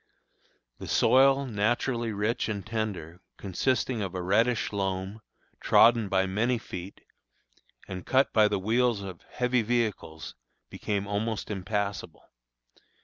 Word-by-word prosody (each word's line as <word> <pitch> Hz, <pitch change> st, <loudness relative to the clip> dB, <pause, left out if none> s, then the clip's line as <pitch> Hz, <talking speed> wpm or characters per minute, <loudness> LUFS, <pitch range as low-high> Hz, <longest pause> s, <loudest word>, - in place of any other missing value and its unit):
The -, -, -7 dB
soil, 135 Hz, +1 st, +4 dB
naturally 115 Hz, +1 st, -1 dB
rich 105 Hz, +3 st, -1 dB
and 100 Hz, -3 st, -4 dB
tender, 100 Hz, -6 st, -4 dB, 0.2 s
consisting 120 Hz, +4 st, -1 dB
of 95 Hz, -2 st, -4 dB
a 90 Hz, -, -2 dB
reddish 110 Hz, +5 st, +1 dB
loam, 95 Hz, +1 st, -3 dB, 0.4 s
trodden 115 Hz, -3 st, +5 dB
by 95 Hz, 0 st, +2 dB
many 110 Hz, +6 st, 0 dB
feet, 95 Hz, -3 st, -8 dB, 0.9 s
and 90 Hz, -2 st, -6 dB
cut 135 Hz, +1 st, +2 dB
by 110 Hz, -1 st, +5 dB
the 105 Hz, -1 st, 0 dB
wheels 110 Hz, +2 st, +1 dB
of 95 Hz, -4 st, -8 dB
heavy 125 Hz, 0 st, +1 dB
vehicles, 110 Hz, -8 st, -2 dB, 0.4 s
became 100 Hz, -1 st, -3 dB
almost 105 Hz, +2 st, -3 dB
impassable. 100 Hz, -3 st, -3 dB
105 Hz, 120 wpm, -28 LUFS, 95-120 Hz, 0.9 s, trodden